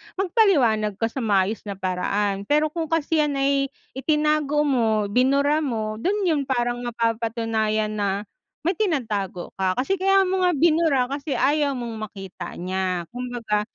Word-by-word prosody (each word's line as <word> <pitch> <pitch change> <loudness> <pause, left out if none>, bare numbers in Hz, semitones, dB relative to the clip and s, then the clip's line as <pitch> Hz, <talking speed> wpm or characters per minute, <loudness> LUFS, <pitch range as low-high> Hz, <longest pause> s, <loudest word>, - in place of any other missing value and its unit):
magpaliwanag 285 - +2
ka 225 +3 -1
sa - - -4
maayos 210 -2 +1
na 200 - -4
paraan. 195 +2 -1
Pero 300 +1 +3
kung 325 0 -3
kasi 325 0 0
'yan 295 -2 +1
ay 275 0 +2 0.2
itinago 300 +1 +1
mo, 220 -7 +1
binura 280 +5 +3
mo, 220 -7 -2
do'n 400 - 0
'yon 305 -3 +2
parang 240 -2 0
mapapatunayan 225 -2 -1
na 205 -1 -1 0.4
may 355 - +2
tinatago 220 - -2
ka. 190 -1 -1
Kasi 270 +10 0
kaya 390 +1 +3
mo 375 0 0 0.2
binura 315 -4 +3
kasi 280 +2 -3
ayaw 285 -1 +2
mong 225 -3 -5
makita 190 -3 -8
niya. 185 -1 -2
Kumbaga, 240 -4 -2
245 Hz, 145 wpm, -23 LUFS, 210-300 Hz, 0.4 s, Pero